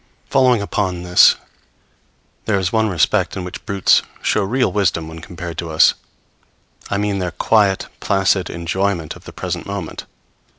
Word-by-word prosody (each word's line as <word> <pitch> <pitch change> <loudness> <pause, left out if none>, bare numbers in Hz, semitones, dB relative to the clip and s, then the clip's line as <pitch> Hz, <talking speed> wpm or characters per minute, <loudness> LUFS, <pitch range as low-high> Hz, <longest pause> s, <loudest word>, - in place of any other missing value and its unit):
Following 125 -5 +3
upon 95 -3 -2
this, 90 0 +6 1.1
there 105 -3 +1
is 90 -2 -1
one 110 -1 +2
respect 90 -5 +1
in 95 - -4
which 90 0 -8
brutes 100 -2 +3 0.2
show 105 - +2
real 125 +6 +1
wisdom 85 -6 0
when 80 0 -9
compared 85 -1 -6
with 85 -2 -6
us 80 - +6 1.0
I 100 - 0
mean, 100 -1 -1
their 90 -1 -1
quiet, 95 +3 +2
placid 95 -1 +1
enjoyment 85 -1 -2
of - - -16
the - - -9
present - - -5
moment. - - -6
95 Hz, 155 wpm, -19 LUFS, 85-100 Hz, 1.1 s, this